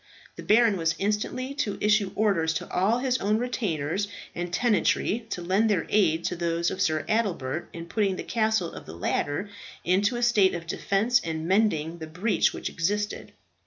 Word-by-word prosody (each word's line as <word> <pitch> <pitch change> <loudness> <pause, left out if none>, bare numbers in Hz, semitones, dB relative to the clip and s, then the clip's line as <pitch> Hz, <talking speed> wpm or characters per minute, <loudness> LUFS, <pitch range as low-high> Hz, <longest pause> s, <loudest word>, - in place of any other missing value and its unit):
The - - -8
baron 220 -1 +4
was 165 -1 0
instantly 215 +6 -2
to 210 -8 -1
issue 210 -2 +2
orders 170 -7 +1
to - - -3
all 195 +6 +2
his 255 0 0
own 210 +2 +1
retainers 200 - -2 0.3
and 175 0 -4
tenantry 225 +1 +1
to 175 - -4
lend 195 +5 +2
their 185 -6 +1
aid 170 -6 +2
to 180 - -1
those 170 0 0
of - - -4
Sir 155 -1 +1
Adelbert 175 - -1
in 165 0 -7
putting 195 +1 0
the - - -5
castle 220 -6 0
of - - -10
the 80 - -8
latter 145 - -1 0.4
into 200 +6 +2
a 240 - -2
state 210 -6 +4
of 170 -1 -6
defence 215 +8 +1
and 160 -1 -3
mending 170 -5 +1
the 160 - -6
breach 180 +8 +1
which - - -5
existed. 205 +5 -2
195 Hz, 180 wpm, -26 LUFS, 165-220 Hz, 0.4 s, baron